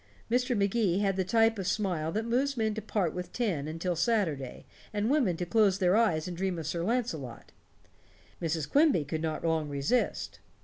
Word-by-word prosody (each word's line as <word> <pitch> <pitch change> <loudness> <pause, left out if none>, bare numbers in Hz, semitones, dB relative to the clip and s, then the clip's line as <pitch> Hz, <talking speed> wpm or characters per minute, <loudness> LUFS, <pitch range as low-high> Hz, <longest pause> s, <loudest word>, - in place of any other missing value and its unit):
Mr. 245 0 +1
Magee 200 -2 +1
had 195 -1 +1
the 190 - +1
type 225 +3 +2
of 190 - -3
smile 180 -6 -1
that 220 +5 -2
moves 260 +4 0
men 220 -1 +1
to 220 - -4
part 195 -6 -1
with 180 0 -6
ten 185 - -1
until 165 +3 -2
Saturday, 165 - -1 0.3
and 210 +3 0
women 245 - +2
to 175 - -2
close 205 0 +3
their 185 -1 +3
eyes 180 -9 +2
and 180 - -5
dream 185 0 -2
of 160 - -5
Sir 170 +3 -2
Launcelot. 180 - -3 0.9
Mrs. 160 -3 -1
Quimby 285 - +3
could 155 +2 -3
not 160 0 -3
long 160 -2 0
resist. 145 - -1
190 Hz, 185 wpm, -29 LUFS, 165-225 Hz, 0.9 s, close